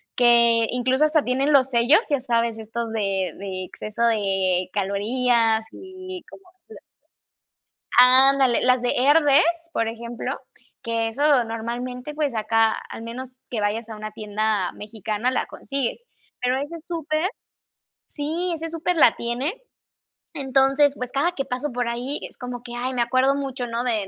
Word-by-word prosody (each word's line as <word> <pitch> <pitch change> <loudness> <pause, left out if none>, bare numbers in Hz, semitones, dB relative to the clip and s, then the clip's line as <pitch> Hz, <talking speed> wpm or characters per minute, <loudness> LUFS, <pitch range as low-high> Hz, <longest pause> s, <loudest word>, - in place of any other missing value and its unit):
que 235 -2 +5
incluso, 255 +3 +1
hasta 305 -1 +2
tienen 270 +4 +1
los 270 -2 +5
sellos, 240 +4 +5
¿ya 285 -2 +1
sabes?, 235 -2 -1
estos 225 +1 -5
de 195 -3 -1
de 190 -1 -5
exceso 215 +5 -3
de 195 -5 +1
calorías, 220 +3 +1
y 370 -1 -9
como 385 - -14 0.3
de 445 - -11 1.2
ándale, 260 0 +6
las 255 -1 +3
de 245 - +1
Herdez, 310 +4 +3
por 230 - 0
ejemplo, 235 +3 -5 0.4
que 230 -1 -1
eso 275 +2 +3
normalmente, 245 +4 -5
pues, 295 -4 -1
acá, 225 0 +2
al - - -8
menos 255 +2 -8
que 230 - -2
vayas 215 +2 -2
a 220 - -7
una 215 0 -7
tienda 215 -2 -1
mexicana, 215 +3 -3
la 255 - -1
consigues. 275 - -4 0.4
Pero 250 +1 +1
ese 290 +4 -5
súper 320 -1 -2 0.8
sí, 330 +5 -3
ese 330 +1 -5
súper 335 +2 -1
la 245 -7 +6
tiene. 245 +8 -2 0.8
Entonces, 275 0 +2
pues, 250 -2 -5
cada 310 +6 +1
que 275 -5 -3
paso 255 +3 -3
por 245 -1 -2
ahí, 245 +5 -3
es - - -13
como 245 -1 -6
que, 240 -1 -9
ay, 255 +2 -2
me 245 - 0
acuerdo 255 +3 +2
mucho, 270 -3 -4
¿no?, 235 +1 -2
de 220 -5 -1
245 Hz, 155 wpm, -23 LUFS, 225-275 Hz, 1.2 s, ándale